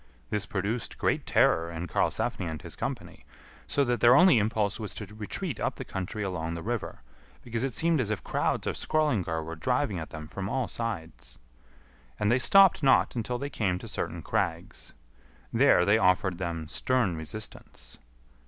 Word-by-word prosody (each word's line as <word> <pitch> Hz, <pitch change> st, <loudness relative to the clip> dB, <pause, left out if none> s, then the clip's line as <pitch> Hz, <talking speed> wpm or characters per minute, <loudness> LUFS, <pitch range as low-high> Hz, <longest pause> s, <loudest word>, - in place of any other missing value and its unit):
This 105 Hz, -2 st, -1 dB
produced 105 Hz, +4 st, -3 dB
great -, -, 0 dB
terror 85 Hz, +1 st, +3 dB
in 85 Hz, +1 st, -5 dB
Karlsefni 90 Hz, -, -1 dB
and 80 Hz, -1 st, -5 dB
his -, -, -8 dB
company, -, -, -5 dB, 0.4 s
so 140 Hz, -, +2 dB
that 120 Hz, -2 st, 0 dB
their 120 Hz, +1 st, +7 dB
only 180 Hz, -9 st, +7 dB
impulse 105 Hz, 0 st, 0 dB
was 105 Hz, -2 st, -6 dB
to 105 Hz, -, -6 dB
retreat 110 Hz, -, -5 dB
up -, -, -1 dB
the -, -, -7 dB
country 95 Hz, +3 st, -4 dB
along 85 Hz, -4 st, -3 dB
the 85 Hz, -, -6 dB
river, 115 Hz, -, -4 dB, 0.4 s
because 115 Hz, -1 st, -3 dB
it 135 Hz, -3 st, -2 dB
seemed 165 Hz, -3 st, +2 dB
as 110 Hz, -, -2 dB
if 110 Hz, -4 st, -3 dB
crowds -, -, -1 dB
of -, -, -1 dB
Skrœlingar 100 Hz, -, 0 dB
were 80 Hz, +1 st, -6 dB
driving 125 Hz, -, 0 dB
at 80 Hz, -, -7 dB
them 80 Hz, -1 st, -8 dB
from 95 Hz, +4 st, -5 dB
all 130 Hz, +1 st, -1 dB
sides. 85 Hz, -, -5 dB, 0.8 s
And 105 Hz, +1 st, +2 dB
they 125 Hz, -, +3 dB
stopped 195 Hz, +6 st, +6 dB
not 135 Hz, -2 st, +4 dB
until 120 Hz, +1 st, -2 dB
they 140 Hz, +3 st, -5 dB
came 95 Hz, -8 st, 0 dB
to -, -, -9 dB
certain -, -, -4 dB
crags. -, -, -3 dB, 0.6 s
There 90 Hz, -, +5 dB
they 105 Hz, +2 st, +4 dB
offered 95 Hz, -2 st, +2 dB
them 85 Hz, -3 st, -3 dB
stern 120 Hz, 0 st, +1 dB
resistance. 80 Hz, -, -8 dB
105 Hz, 175 wpm, -28 LUFS, 85-125 Hz, 0.8 s, their